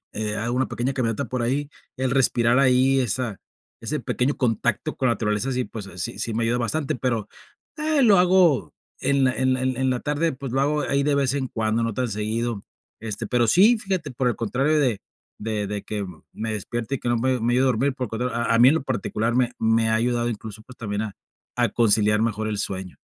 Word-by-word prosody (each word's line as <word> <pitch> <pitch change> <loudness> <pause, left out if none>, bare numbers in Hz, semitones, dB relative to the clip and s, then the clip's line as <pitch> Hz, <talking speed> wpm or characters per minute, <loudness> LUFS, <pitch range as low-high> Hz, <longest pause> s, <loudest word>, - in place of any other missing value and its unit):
Eh, 105 0 -2
hago 120 +3 -2
una 130 0 +1
pequeña 130 +3 -2
caminata 125 +1 -1
por 125 0 -3
ahí, 140 +5 -1 0.3
el 130 -1 0
respirar 125 -2 +3
ahí 130 0 +4
esa 125 -4 -1 0.4
ese - - -2
pequeño 130 +4 -1
contacto 115 -5 0
con 130 - 0
la 115 - +2
naturaleza, 105 +5 -1
sí, 125 -1 -1
pues 105 -4 -8
sí, 105 +7 -4
sí 115 - -2
me 115 +1 0
ayuda 120 +2 +1
bastante, 135 +5 -1
pero, 115 -4 -1 0.5
eh, 305 -1 +1
lo 210 -5 +6
hago 180 - +3 0.3
en 140 -1 +2
la 130 - +2
en 130 0 +1
en 130 0 0
la 125 -1 0
tarde, 150 +3 0
pues, 135 -1 -7
lo 135 - +2
hago 150 +1 +1
ahí 140 0 0
de 145 0 +2
vez 135 -1 +1
en 135 -2 -1
cuando, 110 0 0
no 115 -2 -1
tan 125 -1 0
seguido. 110 +1 -2 0.4
Este, 115 +1 -4
pero 120 +2 +2
sí, 210 - +6
fíjate, 185 -8 -3
por 125 +1 -1
el 115 - -2
contrario, 135 +7 +1
de 125 -8 +1 0.4
de 105 -1 -2
de 105 0 -4
que 105 -2 -4 0.3
me 110 0 -4
despierte, 120 +5 -3
y - - -6
que 120 - -3
no 120 - +2
me 130 +2 +1
me 120 +1 +1
ayude 130 +2 +3
a - - +3
dormir, 130 +2 +1
por 125 - -2
lo - - -10
contrario, 120 +1 -3
a 115 -1 +2
mí 125 +2 +8
en 155 - +3
lo 160 - -1
particular 120 -3 -1
me 125 -1 +2
me 115 0 +2
ha 110 - +3
ayudado, 120 +1 +1
incluso, 110 -1 -7
pues, 125 +3 -15
también 105 -2 -3
a 105 -3 -5 0.4
a - - +2
conciliar 105 -2 +3
mejor 110 -1 -1
el 105 -1 -2
sueño. 95 -3 -3
120 Hz, 225 wpm, -24 LUFS, 110-135 Hz, 0.5 s, mí